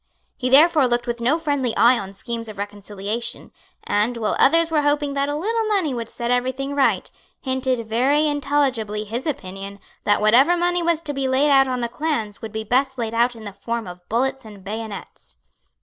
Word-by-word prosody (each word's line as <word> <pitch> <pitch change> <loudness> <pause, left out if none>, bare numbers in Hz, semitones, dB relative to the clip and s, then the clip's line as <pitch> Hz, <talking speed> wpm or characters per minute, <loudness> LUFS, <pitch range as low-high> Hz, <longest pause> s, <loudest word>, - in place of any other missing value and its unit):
He 255 -2 -2
therefore 300 +1 +6
looked 240 0 0
with 240 -1 -3
no 260 +7 +2
friendly 285 -7 -1
eye 240 +1 +5
on 195 0 -7
schemes 230 +2 -5
of 215 - -9
reconciliation, 205 +2 -5 0.3
and, 215 +4 0
while 220 -2 -1
others 330 +3 +4
were 305 -2 +3
hoping 290 -1 +1
that 280 0 0
a 290 - -1
little 445 +8 -1
money 385 -10 +1
would 230 -2 -5
set 235 0 -3
everything 260 +3 -1
right, 280 -1 +1 0.3
hinted 260 -3 -1
very 265 +7 +2
intelligibly 275 -8 0
his 230 +7 -5
opinion 195 -6 -5 0.2
that 205 - +3
whatever 255 +11 +5
money 350 0 +1
was 335 -1 +1
to 300 -3 -4
be 270 -1 -1
laid 270 +3 +2
out 270 -1 +5
on 255 -1 -2
the 235 - 0
clans 235 -6 -3
would 225 - -6
be 220 0 -4
best 265 +4 +1
laid 230 -2 -3
out 240 +1 +2
in 225 - -11
the 205 -2 -7
form 230 +2 -4
of 180 0 -11
bullets 265 +4 0
and 205 -3 -12
bayonets. 210 - -8
250 Hz, 195 wpm, -22 LUFS, 220-285 Hz, 0.3 s, therefore